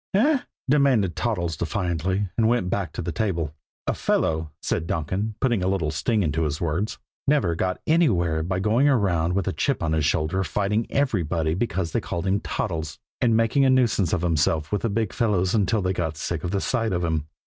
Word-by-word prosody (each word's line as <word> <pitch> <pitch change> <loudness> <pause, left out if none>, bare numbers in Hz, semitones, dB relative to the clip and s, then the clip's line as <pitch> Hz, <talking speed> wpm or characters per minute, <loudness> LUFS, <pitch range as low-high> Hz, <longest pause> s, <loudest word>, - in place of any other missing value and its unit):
"Eh?" 280 +8 +4 0.3
demanded 130 - +3
Toddles 90 -9 -1
defiantly; 90 +2 -1
and 115 -1 +3
went 115 -6 +1
back 100 -3 -1
to - - -4
the 85 - -2
table. 85 -8 -1 0.3
"A - - 0
fellow," 80 0 0
said 80 -1 -2
Donkin, 95 +8 -2
putting 120 -7 +1
a 90 - 0
little 90 -6 0
sting 105 +7 0
into 80 0 0
his 75 -2 -1
words, 85 +6 -1 0.3
"never 135 - +3
got 90 +2 -1
anywhere 90 - +2
by 90 +3 -1
going 115 +9 +3
around 90 - +2
with 95 -1 -1
a 95 - 0
chip 140 -10 0
on 80 - 0
his 80 -1 +1
shoulder 80 +5 +1
fighting 105 +5 0
everybody 85 - 0
because 95 -4 -1
they - - 0
called 85 +1 -4
him 95 +1 +2
Toddles, 80 -8 -3 0.2
and 115 -2 +4
making 115 +5 +3
a 135 - +5
nuisance 115 -9 +3
of 90 -2 0
himself 80 -2 +1
with 105 - 0
the 115 - 0
Big 110 0 -1
Fellows 95 -5 +1
until 105 -1 +2
they 95 0 +1
got 80 -4 -2
sick 80 0 -3
of 90 - -2
the 100 +1 -1
sight 115 -5 0
of 90 0 -1
him." 80 -3 -1
95 Hz, 200 wpm, -24 LUFS, 80-110 Hz, 0.3 s, a